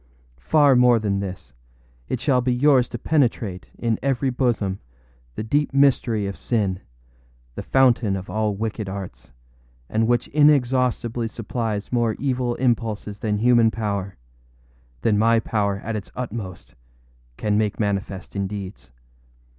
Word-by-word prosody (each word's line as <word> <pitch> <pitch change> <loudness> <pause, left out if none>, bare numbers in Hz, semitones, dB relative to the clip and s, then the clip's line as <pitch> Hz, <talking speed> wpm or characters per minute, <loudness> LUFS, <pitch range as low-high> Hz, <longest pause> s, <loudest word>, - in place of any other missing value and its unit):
Far 145 - +4
more 125 -1 +5
than 100 -3 -1
this. 90 -10 -7 0.6
It 130 - -1
shall 130 0 +2
be 125 +1 0
yours 130 0 +3
to - - -5
penetrate, 115 - 0
in 115 -2 -1
every 135 0 0
bosom, 115 -7 0 0.6
the - - -4
deep 145 +5 0
mystery 125 -6 +3
of 100 0 -4
sin, 100 -6 -1 0.7
the - - -5
fountain 120 -6 +3
of 95 0 -6
all 105 -1 -1
wicked 110 -1 -3
arts, 95 -11 -8 0.6
and 110 - 0
which 120 -1 +1
inexhaustibly 125 -5 +2
supplies 110 -2 -4
more 120 -3 +1
evil 125 -3 -1
impulses 110 -4 -1
than 105 -2 -1
human 120 0 +4
powerâthan 100 -3 -3 1.0
my 115 +2 +4
power 100 -3 -1
at 110 0 -3
its 105 - -6
utmostâcan - - -7
make 105 -1 0
manifest 100 -2 -3
in 100 -1 -1
deeds. 95 - -8
110 Hz, 130 wpm, -23 LUFS, 100-125 Hz, 1.0 s, more